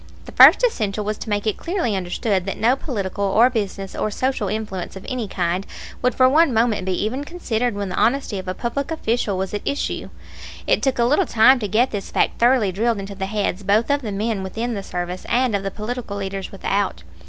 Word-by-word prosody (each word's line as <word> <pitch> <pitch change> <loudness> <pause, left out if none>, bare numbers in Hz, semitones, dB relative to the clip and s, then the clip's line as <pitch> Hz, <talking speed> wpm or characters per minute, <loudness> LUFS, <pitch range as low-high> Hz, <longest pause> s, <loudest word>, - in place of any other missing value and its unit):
The - - -10
first - - +8
essential 215 - 0
was 215 0 -3
to - - -6
make 205 0 -1
it 215 - 0
clearly 335 - -1
understood 190 +1 -1
that 195 - -3
no 235 +4 +3
political 200 -8 -4
or 220 +6 +4
business 200 -4 -3
or - - -1
social 255 -1 -1
influence 205 -4 -4
of 190 - -9
any 250 -4 -3
kind 180 0 -1 0.4
would 250 0 +1
for 255 - +5
one 310 +3 +4
moment 225 -4 +1
be 185 +2 0
even 255 +6 -2
considered 245 -9 -2
when 200 -1 -3
the 180 - -4
honesty 230 -2 +1
of 185 - -8
a 185 - -3
public 255 +6 -3
official 235 - -1
was 190 +1 -3
at 205 - -2
issue. 280 - -3 0.6
It - - +2
took 270 -2 0
a 235 - +3
little 295 +9 +2
time 250 +4 +5
to 210 - -2
get 230 +6 +2
this 205 -2 -4
fact - - 0
thoroughly 235 -4 +4
drilled 225 +4 0
into 195 0 -6
the 190 -1 -4
heads 205 -2 -1
both 210 +6 +2
of 285 0 +1
the 220 -5 -4
men 210 +1 -1
within 225 +6 -3
the 200 - -3
service 180 -1 -5
and 245 -2 +2
of 200 - 0
the 195 - -3
political 215 0 -5
leaders 195 -1 -4
without. 195 - -2
215 Hz, 220 wpm, -21 LUFS, 195-245 Hz, 0.6 s, first